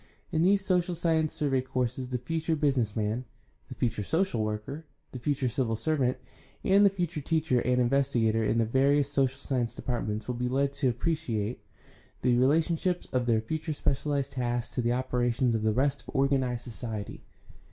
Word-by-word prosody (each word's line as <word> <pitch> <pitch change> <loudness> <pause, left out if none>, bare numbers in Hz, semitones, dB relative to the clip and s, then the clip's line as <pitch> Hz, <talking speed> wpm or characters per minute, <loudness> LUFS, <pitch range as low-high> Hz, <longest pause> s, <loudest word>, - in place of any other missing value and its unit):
In 160 -2 +1
these 195 +2 +3
social 180 -2 +1
science 160 -2 +1
survey 135 -3 0
courses 130 -1 -2
the 125 0 -2
future 160 +6 -1
business 135 -8 +1
man, 110 +3 -1 0.5
the 130 - -7
future 115 -3 -1
social 160 - 0
worker, 110 +8 -4 0.3
the 130 - -6
future 135 +1 0
civil 120 -1 0
servant, 130 +1 0 0.5
and 200 +2 +5
the 200 - +7
future 175 -5 -3
teacher 155 -3 +1
and 125 +1 +1
investigator 120 -3 +2
in 110 - +1
the 115 - +3
various 140 +4 +2
social 135 -2 +1
science 125 -4 -2
departments 110 -5 -3
will 125 - -1
be 125 +1 -2
led 140 +2 +1
to 135 -2 +1
appreciate 120 -5 -2 0.6
the 125 -1 +4
relationships 165 +7 +2
of 125 -1 +1
their 115 -2 +3
future 155 +7 -3
specialized 140 -1 -1
tasks 120 -2 -2
to 125 - 0
the 120 0 +1
operations 125 -1 +1
of 110 - 0
the 110 0 +2
rest 135 +4 +1
of - - -12
organized 130 -3 +1
society. 110 -3 -6
130 Hz, 175 wpm, -29 LUFS, 120-150 Hz, 0.6 s, the